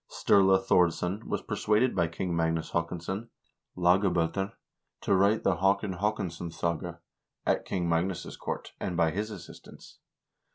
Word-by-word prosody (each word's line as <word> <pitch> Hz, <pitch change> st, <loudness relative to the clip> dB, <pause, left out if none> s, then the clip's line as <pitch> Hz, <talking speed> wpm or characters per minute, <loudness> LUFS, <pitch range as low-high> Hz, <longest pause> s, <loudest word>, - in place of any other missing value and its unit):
Sturla 95 Hz, -1 st, +4 dB
Thordsson 90 Hz, +2 st, +1 dB
was -, -, -3 dB
persuaded 110 Hz, +3 st, +1 dB
by 85 Hz, -3 st, +2 dB
King 85 Hz, +2 st, -3 dB
Magnus 80 Hz, -1 st, 0 dB
Haakonsson 90 Hz, +6 st, -3 dB, 0.5 s
(Lagab0ter) 90 Hz, +2 st, +2 dB, 0.5 s
to -, -, +1 dB
write 100 Hz, +3 st, +3 dB
the 95 Hz, -3 st, +2 dB
"Haakon 95 Hz, +1 st, +1 dB
Haakonssonssaga" 85 Hz, -4 st, -2 dB, 0.5 s
at -, -, +1 dB
King 90 Hz, -3 st, -1 dB
Magnus' 85 Hz, +2 st, -1 dB
court, -, -, -5 dB
and 90 Hz, -, -3 dB
by 85 Hz, -2 st, +3 dB
his 105 Hz, +5 st, -2 dB
assistance. 95 Hz, -5 st, -12 dB
90 Hz, 125 wpm, -29 LUFS, 85-100 Hz, 0.5 s, Sturla